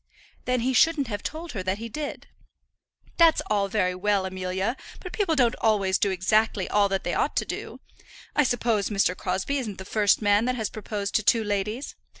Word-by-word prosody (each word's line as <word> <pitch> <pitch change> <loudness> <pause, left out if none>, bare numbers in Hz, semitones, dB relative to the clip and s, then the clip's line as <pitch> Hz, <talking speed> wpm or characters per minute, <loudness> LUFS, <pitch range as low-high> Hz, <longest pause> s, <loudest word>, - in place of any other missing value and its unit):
"Then 250 -1 +1
he 260 +2 0
shouldn't 290 -2 +3
have 205 -2 -3
told 320 +2 -5
her 200 - -4
that 185 +1 -1
he 230 +2 -6
did." 295 +5 -6 0.9
"That's 330 -2 +6
all 200 -1 +2
very 190 -3 0
well, 195 +1 0
Amelia; 190 +4 -2 0.2
but 365 - -8
people 385 -7 +1
don't 245 -5 +3
always 200 -4 +2
do 200 - +2
exactly 195 +1 +1
all 205 -1 +2
that 195 0 -1
they - - -2
ought - - 0
to - - +1
do. - - -6 0.6
I 295 - +4
suppose 235 -5 0
Mr. 195 -3 +1
Crosbie 190 +12 -2
isn't 215 -7 -5
the 190 - -8
first 205 0 +2
man 205 +1 +3
that 255 0 0
has 220 -4 -3
proposed 205 -2 -4
to 215 - -3
two 225 +2 +3
ladies. 210 +5 -2
210 Hz, 195 wpm, -26 LUFS, 195-245 Hz, 0.9 s, That's